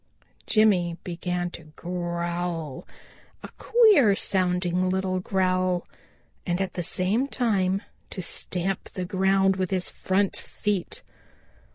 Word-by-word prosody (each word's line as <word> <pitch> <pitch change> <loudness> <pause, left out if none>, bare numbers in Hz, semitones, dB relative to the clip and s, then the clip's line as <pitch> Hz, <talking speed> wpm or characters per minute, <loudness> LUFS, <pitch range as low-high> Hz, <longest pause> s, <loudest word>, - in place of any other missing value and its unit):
Jimmy 185 -6 +3
began 175 0 -3
to 165 - -10
growl, 170 -3 -3 0.6
a - - -7
queer 410 - +5
sounding 180 -1 +1
little 185 0 0
growl, 185 -1 0 0.6
and 175 0 -1
at 190 -1 -2
the 180 - -3
same 195 +9 0
time 200 -8 +1 0.3
to 185 - -5
stamp 185 +3 -1
the 185 - -3
ground 190 0 +2
with 185 -2 -1
his 185 -2 0
front 190 +1 0
feet. 205 -4 -3
185 Hz, 110 wpm, -26 LUFS, 175-195 Hz, 0.6 s, queer